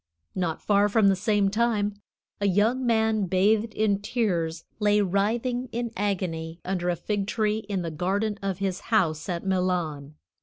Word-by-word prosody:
Not 170 -3 -2
far 205 0 +3
from 210 -1 +4
the 195 - +3
same 205 +1 +2
time, 215 -2 +1 0.5
a 200 - +1
young 225 +7 +2
man 220 -3 +2
bathed 210 +5 +2
in 205 -2 +1
tears 175 -8 -1 0.2
lay 210 -1 +3
writhing 225 +6 0
in 235 0 -3
agony 175 -5 -2
under 180 -1 -1
a 175 - +1
fig 200 +2 -2
tree 215 0 0
in 190 -3 -1
the 165 - -3
garden 200 +6 -1
of 195 -2 -2
his 195 -1 -2
house 165 -7 +1
at 175 +1 -3
Milan. 175 -6 -1
200 Hz, 160 wpm, -26 LUFS, 180-215 Hz, 0.5 s, from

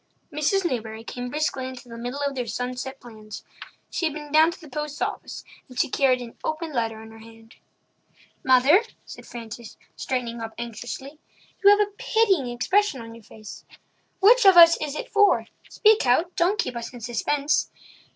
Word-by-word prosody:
Mrs. 325 +6 +1
Newbury 225 -6 -3
came 245 +1 -6
briskly 275 -2 -2
into 255 -1 -10
the 230 - -10
middle 245 +4 -5
of 280 - -1
their 250 -3 -4
sunset 250 +3 -5
plans. 215 -3 -11 0.5
She 335 - 0
had 305 - -5
been 295 -1 -8
down 315 +2 +6
to 345 - -8
the 325 - -13
post 300 +1 -5
office, - - -4 0.3
and 255 -1 -8
she - - +2
carried 255 -2 +2
an 235 - -11
open 315 0 -3
letter 225 -3 -2
in 220 - -13
her 225 - -14
hand. 225 +1 -16 0.9
"Mother," 265 - +5 0.2
said - - -12
Frances, 230 -1 -9 0.2
straightening 240 -3 -3
up 225 0 -7
anxiously, 240 +5 -7 0.4
"you 400 - +8
have 410 0 +5
a - - -17
pitying 440 - +2
expression 270 +7 0
on 230 0 -9
your 230 -1 -14
face. 215 0 -12 0.6
Which 475 +6 +6
of 385 -3 +7
us 335 -1 +9
is 300 -1 -3
it - - -5
for—speak 420 - +2
out—don't 345 +8 +2
keep 340 - -2
us 235 -1 -6
in 245 - -11
suspense. 280 +6 0
260 Hz, 175 wpm, -24 LUFS, 235-320 Hz, 0.9 s, us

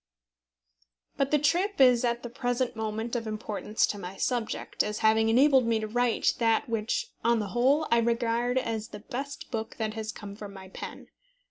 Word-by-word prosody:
But 275 -1 0
the 300 - +4
trip 350 +7 +1
is 250 -3 +6
at 235 0 0
the 240 - -5
present 245 -1 -1
moment 220 +2 -3
of 230 -2 -2
importance 215 0 -1
to 205 - -4
my 185 0 -7
subject, 240 -1 -1
as 210 0 -2
having 220 0 +4
enabled 260 +1 +5
me 225 -1 +2
to 215 - -3
write 240 +2 +1
that 225 +3 +2
which, 230 - -2
on 235 0 +3
the 210 -2 -2
whole, 265 +8 +2
I 235 - +5
regard 235 +1 +1
as 225 -3 -2
the 210 - -10
best 275 +5 -6
book 225 -2 -4
that 220 -1 -2
has 220 -1 -4
come 200 -2 -9
from 205 -1 -9
my 190 -1 -10
pen. - - -8
230 Hz, 190 wpm, -28 LUFS, 220-250 Hz, -, is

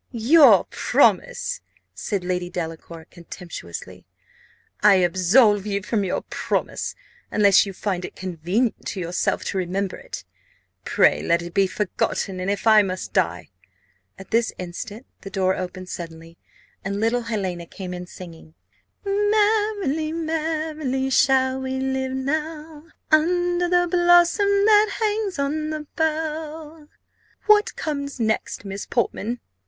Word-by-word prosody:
"Your 240 - +6
promise!" - - +1 0.3
said 185 - -3
Lady 180 -1 -2
Delacour, 165 -1 -6
contemptuously. 95 - -9 0.7
"I 210 -1 +7
absolve 190 +4 +3
you 200 -1 -2
from 210 0 0
your 185 - -2
promise. - - -3 0.3
Unless 200 -1 +4
you - - -4
find 185 -2 -3
it - - -7
convenient 185 +6 -2
to 195 - -4
yourself 175 0 -1
to 190 - -2
remember 185 +2 -2
it, - - -8 0.6
pray - - +3
let 170 0 +1
it 170 0 -8
be 195 -1 +3
forgotten; 190 -1 -2
and 185 +1 -2
if 200 +1 -2
I 215 -1 +7
must 185 -2 -4
die 85 -1 0 0.3
" 90 0 -42
At 195 - -13
this 230 0 +2
instant 185 +6 -7 0.2
the 195 - -8
door 190 -1 +1
opened 185 0 -6
suddenly, 165 -1 -8 0.5
and 200 +1 -3
little 230 +3 +1
Helena 190 -7 -3
came 185 -1 -7
in 180 0 -7
singing 165 -3 -12 0.5
"'Merrily, 410 -6 +1
merrily 310 -4 -2
shall 260 0 +3
we 265 0 -3
live 265 0 -2
now, 305 +3 -4 0.3
Under 350 +2 +2
the 355 0 +3
blossom 350 +3 +4 0.2
that 425 -1 +4
hangs 425 -4 -1
on 300 +2 -1
the 310 -1 -4
bough.' 315 -1 -3 0.6
What 425 -1 +4
comes 280 -3 -4
next, 220 -2 -1
Miss 195 0 -6
Portman?" 235 0 -1
225 Hz, 130 wpm, -23 LUFS, -, 0.7 s, I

